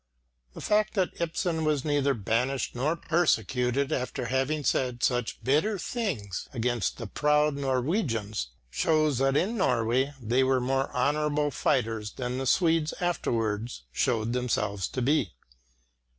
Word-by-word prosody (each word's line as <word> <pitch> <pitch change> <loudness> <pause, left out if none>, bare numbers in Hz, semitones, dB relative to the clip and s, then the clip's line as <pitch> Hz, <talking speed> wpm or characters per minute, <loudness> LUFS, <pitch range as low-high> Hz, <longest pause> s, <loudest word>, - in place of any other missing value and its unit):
The - - -8
fact 215 +1 +1
that 185 -3 -1
Ibsen 165 0 -1
was 150 -3 0
neither 145 -2 +2
banished 120 +5 -1
nor 140 +7 0
persecuted 140 -5 +1
after 130 -2 -2
having 135 +5 0
said 125 -1 0
such 120 -2 0
bitter 155 +11 +2
things 160 - -3
against 120 -3 -1
the 115 - -5
proud 150 +5 +2
Norwegians, 130 - -1 0.2
shows 155 - +2
that 135 +1 +2
in 220 +8 0
Norway 125 - +1
they 120 +2 +2
were 130 0 +3
more 135 +2 0
honourable 150 +2 +1
fighters 110 -4 0
than 125 0 -3
the 135 - -2
Swedes 165 0 +2
afterwards 115 - -1
showed 115 - 0
themselves 105 -6 -1
to 130 - -3
be. 130 - +1
135 Hz, 135 wpm, -28 LUFS, 120-155 Hz, 0.2 s, were